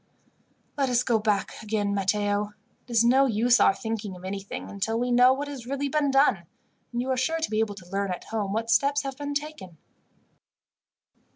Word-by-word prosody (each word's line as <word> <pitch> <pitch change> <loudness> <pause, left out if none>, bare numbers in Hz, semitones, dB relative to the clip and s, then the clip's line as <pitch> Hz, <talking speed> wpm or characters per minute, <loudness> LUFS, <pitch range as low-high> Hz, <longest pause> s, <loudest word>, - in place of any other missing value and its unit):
"Let 270 -2 +2
us 245 0 +2
go 235 -3 +2
back 210 -2 -1
again, 205 -2 -1
Matteo. 205 +1 0 0.3
It - - -11
is 230 -1 +4
no 265 +3 +5
use 240 +1 +3
our 195 - +5
thinking 220 -4 -4
of 180 +1 -11
anything 195 +1 -5
until 215 +3 -2
we 245 +1 -1
know 250 +1 +6
what 280 +2 -2
has 265 -5 -8
really 275 +1 -2
been 295 -1 +1
done, 270 - +3 0.4
and 240 0 -2
you 260 - -2
are - - +2
sure 320 +6 0
to 320 - -2
be 215 - 0
able 215 -2 0
to 180 -2 -13
learn, 200 0 -1
at 180 -1 -4
home, 210 -3 -3
what 225 +2 -1
steps 280 +6 +3
have 270 -1 -5
been 285 +1 -5
taken." 285 - -5
225 Hz, 200 wpm, -26 LUFS, 205-265 Hz, 0.4 s, know